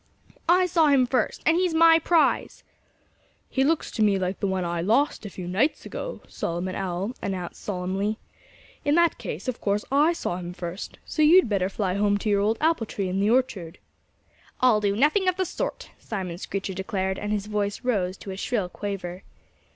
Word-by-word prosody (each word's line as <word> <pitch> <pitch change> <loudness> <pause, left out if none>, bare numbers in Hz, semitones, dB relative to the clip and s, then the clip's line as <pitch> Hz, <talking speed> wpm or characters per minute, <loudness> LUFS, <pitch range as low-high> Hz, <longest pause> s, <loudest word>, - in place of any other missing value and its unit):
"I 365 +1 +5
saw 330 -3 +3
him 275 -3 +5
first. 250 -2 -1
And 325 +1 +4
he's 360 -2 +1
my 330 0 +7
prize." 330 0 +1 0.9
"He 265 - +2
looks 315 +3 +1
to 220 - -3
me 205 -2 +4
like 185 0 -2
the 200 - 0
one 190 -1 -1
I 170 0 -2
lost 225 - +1
a - - -7
few 180 -2 -7
nights 220 - 0
ago," - - -6
Solomon 175 +2 -3
Owl 190 +4 -3
announced 185 -3 -4
solemnly. 195 +2 -2 0.7
"In 290 0 +2
that 340 -5 +3
case, 195 - -6
of 255 -2 -3
course 205 0 0
I 295 +5 +4
saw 175 - -3
him 175 -1 -6
first. 175 +2 -6
So 310 - -2
you'd 335 +3 +7
better 195 -3 0
fly 195 -2 -1
home 205 +1 +2
to 210 - -2
your 200 -1 +3
old 215 +2 +1
apple 315 -8 +1
tree 195 -3 -3
in 190 +1 -1
the 200 +2 +2
orchard." 220 -9 0 0.8
"I'll 245 -4 +4
do 200 -1 +1
nothing 305 - +3
of 365 - +3
the 375 - +1
sort!" - - -4
Simon 185 -5 -5
Screecher 195 0 -4
declared; 190 0 -2
and 210 0 -3
his 210 -1 -1
voice 210 +1 -2
rose 195 -7 0
to 195 - -8
a 190 - -6
shrill 205 -3 -1
quaver. 190 -2 -5
205 Hz, 195 wpm, -25 LUFS, 190-275 Hz, 0.9 s, my